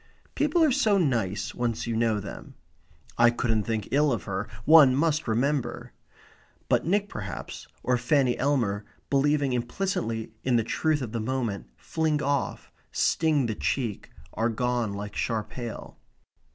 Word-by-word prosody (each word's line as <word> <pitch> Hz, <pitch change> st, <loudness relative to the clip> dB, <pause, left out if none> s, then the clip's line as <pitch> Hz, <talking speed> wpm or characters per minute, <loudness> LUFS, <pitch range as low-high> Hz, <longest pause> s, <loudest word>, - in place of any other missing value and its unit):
"People 305 Hz, +3 st, +2 dB
are 305 Hz, -, +4 dB
so 215 Hz, -4 st, +3 dB
nice, 115 Hz, -, 0 dB
once 120 Hz, -2 st, -2 dB
you 115 Hz, -1 st, -2 dB
know 110 Hz, -2 st, +1 dB
them." 100 Hz, -, -9 dB, 0.6 s
"I 120 Hz, 0 st, +7 dB
couldn't 115 Hz, -3 st, 0 dB
think 110 Hz, -3 st, -2 dB
ill 145 Hz, +1 st, +3 dB
of 115 Hz, -8 st, -1 dB
her. 95 Hz, +1 st, -3 dB, 0.2 s
One 150 Hz, -5 st, +8 dB
must 155 Hz, +1 st, +1 dB
remember 130 Hz, +5 st, -1 dB, 0.4 s
" -, -, -32 dB
But -, -, +2 dB
Nick 200 Hz, +3 st, +2 dB
perhaps, 100 Hz, -, -7 dB, 0.2 s
or 125 Hz, -1 st, +1 dB
Fanny 125 Hz, 0 st, +2 dB
Elmer, 120 Hz, -8 st, +1 dB, 0.3 s
believing 140 Hz, -1 st, +2 dB
implicitly 120 Hz, -, -2 dB
in 125 Hz, -2 st, +2 dB
the 115 Hz, -, +3 dB
truth 155 Hz, +3 st, 0 dB
of 115 Hz, -, -5 dB
the 115 Hz, -, -2 dB
moment, 115 Hz, -3 st, -2 dB
fling 160 Hz, -2 st, -1 dB
off, 140 Hz, -2 st, -2 dB, 0.2 s
sting 155 Hz, -5 st, +2 dB
the 110 Hz, -, -1 dB
cheek, 115 Hz, -1 st, -2 dB, 0.2 s
are 115 Hz, +1 st, 0 dB
gone 120 Hz, -2 st, -1 dB
like 105 Hz, 0 st, -6 dB
sharp 110 Hz, -3 st, -2 dB
hail. 120 Hz, -3 st, -7 dB
125 Hz, 150 wpm, -27 LUFS, 110-145 Hz, 0.6 s, One